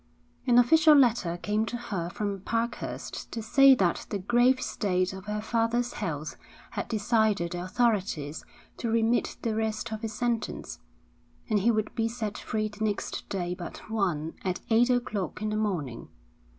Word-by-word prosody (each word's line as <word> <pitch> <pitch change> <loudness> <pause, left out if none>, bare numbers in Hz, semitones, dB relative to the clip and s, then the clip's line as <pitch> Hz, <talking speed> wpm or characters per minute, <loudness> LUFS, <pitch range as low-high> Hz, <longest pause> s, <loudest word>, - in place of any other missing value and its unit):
An 240 -1 +5
official 310 +5 +7
letter 235 -10 +3
came 210 +4 0
to 240 - -3
her 195 -8 -4
from 200 +1 -3
Parkhurst 230 +4 -3
to 225 - -4
say 275 +4 +7
that 185 -7 0
the 205 - -1
grave 240 +6 +3
state 185 -6 0
of 190 -1 -9
her 210 0 -2
father's 235 +2 0
health 155 -7 -4 0.3
had - - -3
decided 215 -5 +1
the 175 0 -3
authorities 185 -8 0 0.3
to 235 - -2
remit 230 +1 +1
the 230 - 0
rest 220 +1 -2
of 215 - -5
his 225 -2 -4
sentence, 235 0 -2 0.7
and 210 - +4
he 215 +4 +2
would 215 -2 0
be 225 -1 0
set 225 -3 -4
free 215 0 -2
the 210 +1 -6
next 210 -2 -2
day 180 -2 -2
but 180 +4 -8
one 170 -8 0
at 185 -1 -1
eight 235 +3 +5
o'clock 240 -6 -1
in 215 0 -2
the - - -1
morning. 175 - -2
215 Hz, 165 wpm, -28 LUFS, 190-235 Hz, 0.7 s, official